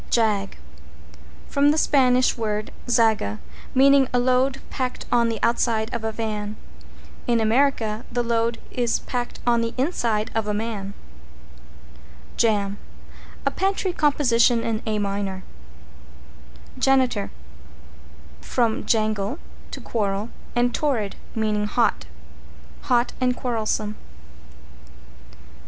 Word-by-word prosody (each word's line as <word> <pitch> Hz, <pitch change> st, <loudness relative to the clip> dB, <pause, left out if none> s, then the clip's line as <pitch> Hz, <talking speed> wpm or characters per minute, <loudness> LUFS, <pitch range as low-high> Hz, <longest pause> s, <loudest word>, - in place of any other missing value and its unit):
=JAG= 210 Hz, -4 st, +1 dB, 0.9 s
From 285 Hz, +1 st, +3 dB
the 300 Hz, -, +2 dB
Spanish 255 Hz, -4 st, +3 dB
word 215 Hz, -2 st, -2 dB, 0.2 s
zaga, 220 Hz, -, +2 dB, 0.4 s
meaning 275 Hz, 0 st, +6 dB
a 250 Hz, -, +2 dB
load 255 Hz, +2 st, +2 dB
packed 255 Hz, -2 st, -3 dB
on 235 Hz, -1 st, +3 dB
the 225 Hz, -, -2 dB
outside 230 Hz, -1 st, +1 dB
of 235 Hz, -2 st, -3 dB
a 220 Hz, -, -1 dB
van. 215 Hz, -1 st, -3 dB, 0.7 s
In 235 Hz, -1 st, +3 dB
America 225 Hz, -1 st, +1 dB
the 240 Hz, +1 st, 0 dB
load 230 Hz, 0 st, 0 dB
is 240 Hz, -2 st, +1 dB
packed 245 Hz, -1 st, -4 dB
on 235 Hz, -1 st, +3 dB
the 230 Hz, 0 st, -3 dB
inside 235 Hz, -6 st, 0 dB
of 225 Hz, -1 st, -1 dB
a 210 Hz, -, 0 dB
man. 205 Hz, -2 st, -4 dB, 1.4 s
=JAM= 205 Hz, -3 st, +1 dB, 0.7 s
A -, -, +2 dB
pantry 385 Hz, -1 st, 0 dB
composition 245 Hz, -6 st, +3 dB
in 225 Hz, -1 st, -1 dB
A 215 Hz, -1 st, 0 dB
minor. 200 Hz, -2 st, -2 dB, 1.4 s
=JANITOR= 255 Hz, -6 st, +2 dB, 1.1 s
From 235 Hz, 0 st, 0 dB
jangle, 215 Hz, +1 st, +1 dB, 0.3 s
to -, -, -7 dB
quarrel, 205 Hz, -1 st, -2 dB, 0.3 s
and 240 Hz, 0 st, +2 dB
torrid, 235 Hz, -10 st, 0 dB, 0.2 s
meaning 210 Hz, -2 st, 0 dB
hot. 235 Hz, +2 st, +1 dB, 0.8 s
Hot 240 Hz, -1 st, +3 dB
and 250 Hz, -1 st, +2 dB
quarrelsome. 215 Hz, -3 st, -1 dB
230 Hz, 110 wpm, -23 LUFS, 215-250 Hz, 1.4 s, meaning